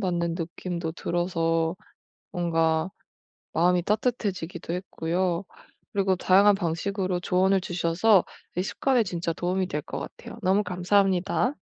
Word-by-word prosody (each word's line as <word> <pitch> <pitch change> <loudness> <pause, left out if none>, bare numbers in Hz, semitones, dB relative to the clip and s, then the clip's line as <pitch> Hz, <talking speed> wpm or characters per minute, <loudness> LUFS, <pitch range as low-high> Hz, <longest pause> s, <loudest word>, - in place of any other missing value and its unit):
받는 170 -3 0
느낌도 170 -1 -4
들어서 165 -1 0 0.6
뭔가 165 -1 +1 0.6
마음이 175 +1 +3
따뜻해지기도 205 -6 -2
했고요. 180 0 -1 0.5
그리고 195 -1 +2
다양한 195 +3 +5
방식으로 185 +1 -1
조언을 190 +2 +2
주셔서 175 +3 +3 0.3
이 180 - +1
습관에 250 +4 +1
진짜 175 -3 -2
도움이 185 +2 -1
될 150 -2 -2
것 - - -6
같아요. - - -9
너무 195 +3 +3
감사합니다. 190 +6 +1
180 Hz, 300 characters per minute, -26 LUFS, 170-195 Hz, 0.6 s, 다양한